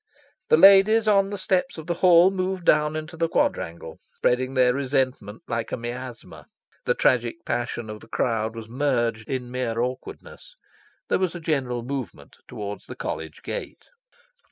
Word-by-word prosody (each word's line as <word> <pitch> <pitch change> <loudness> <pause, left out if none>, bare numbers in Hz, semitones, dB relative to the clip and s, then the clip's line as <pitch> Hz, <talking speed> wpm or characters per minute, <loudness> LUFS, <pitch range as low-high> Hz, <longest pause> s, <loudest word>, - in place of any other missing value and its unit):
The 470 - +6
ladies 200 +3 +7
on 195 -2 +4
the 205 - -4
steps 190 +5 0
of 160 - -8
the 170 - -1
Hall 180 +1 +6
moved 185 -1 -3
down 150 0 +3
into 155 +2 -6
the 165 0 0
quadrangle, 85 - -2 0.2
spreading 130 +2 0
their 125 -1 +4
resentment 130 -6 -2
like 115 -1 -3
a - - -2
miasma. 120 0 -8 0.4
The - - +2
tragic 120 -2 +1
passion 120 -1 -3
of 105 0 -7
the - - -15
crowd 115 -1 -1
was 115 -1 -8
merged 120 -3 -1
in 125 -2 -3
mere 125 -3 -2
awkwardness. 125 - -6 0.5
There - - +2
was 185 -2 -1
a - - -5
general 135 -7 -1
movement 120 - -6
towards 105 -1 -7
the - - -8
College - - -6
gate. - - -6
130 Hz, 160 wpm, -24 LUFS, 115-170 Hz, 0.5 s, ladies